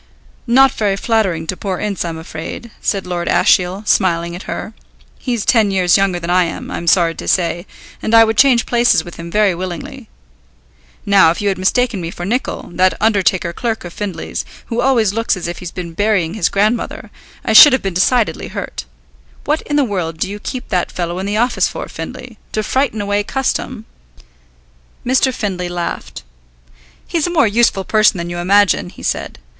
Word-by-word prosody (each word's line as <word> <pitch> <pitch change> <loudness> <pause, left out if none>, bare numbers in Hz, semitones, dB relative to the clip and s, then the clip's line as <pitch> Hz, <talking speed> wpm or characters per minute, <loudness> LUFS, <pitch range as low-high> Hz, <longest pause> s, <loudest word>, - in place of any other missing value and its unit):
"Not 265 +2 +5
very 205 -3 0
flattering 195 -6 0
to 185 - -3
poor 190 -1 -4
Ince 200 -3 -2
I'm 165 -2 -4
afraid," 165 +7 -8
said 195 -2 -1
Lord 175 -1 -3
Ashiel, 185 +3 +2
smiling 170 -3 +1
at 180 - -9
her. 220 - -5 0.5
"He's 240 -5 -2
ten 225 -4 +3
years 185 -3 +3
younger 195 -2 +1
than 170 +1 -4
I 180 0 +4
am, 165 - -6
I'm 170 - -5
sorry 170 -1 +4
to - - -8
say, 175 0 0 0.3
and 225 - +1
I 225 - +9
would 225 0 0
change 250 0 +4
places 240 -8 +2
with 175 - -10
him 170 0 -7
very 210 +1 +2
willingly. 180 0 -7 1.0
Now, 195 -5 +5
if 165 - -1
you 205 - 0
had 190 - -2
mistaken 220 +2 +1
me 165 - -4
for 175 +1 -7
Nicol, 245 0 -3
that 185 +1 +2
undertaker 190 -5 +1
clerk 225 -2 -3
of 175 - -8
Findlay's, 195 -6 -4 0.2
who 235 +1 -2
always 235 -6 +2
looks 225 -2 0
as 175 - -5
if 175 - -5
he's 180 - -6
been 170 -2 -7
burying 195 -3 +1
his 215 -6 0
grandmother, 215 +4 -1 0.3
I - - +1
should 295 - +10
have 260 - +1
been 195 -2 -2
decidedly 220 +6 +1
hurt. - - -6 0.6
What 300 +2 0
in 290 - -1
the 290 - +4
world 180 -8 -3
do 175 - -1
you 205 +2 -6
keep 255 +4 -6
that 180 -3 -1
fellow 175 0 -3
in 190 - -3
the 205 +1 -1
office 240 +2 +2
for, - - -6
Findlay? 230 -4 -8
To 215 - -1
frighten 260 -3 0
away 205 0 0
custom?" 255 -2 -3 1.2
Mr. 260 +1 +2
Findlay 190 -7 -3
laughed. 175 -1 -5 0.8
"He's 335 -2 -1
a - - -2
more 325 -6 +3
useful 215 -2 +2
person 215 0 +3
than 170 0 -4
you 175 - -4
imagine," 200 +1 +3
he - - -14
said. - - -3
200 Hz, 190 wpm, -17 LUFS, 175-225 Hz, 1.2 s, should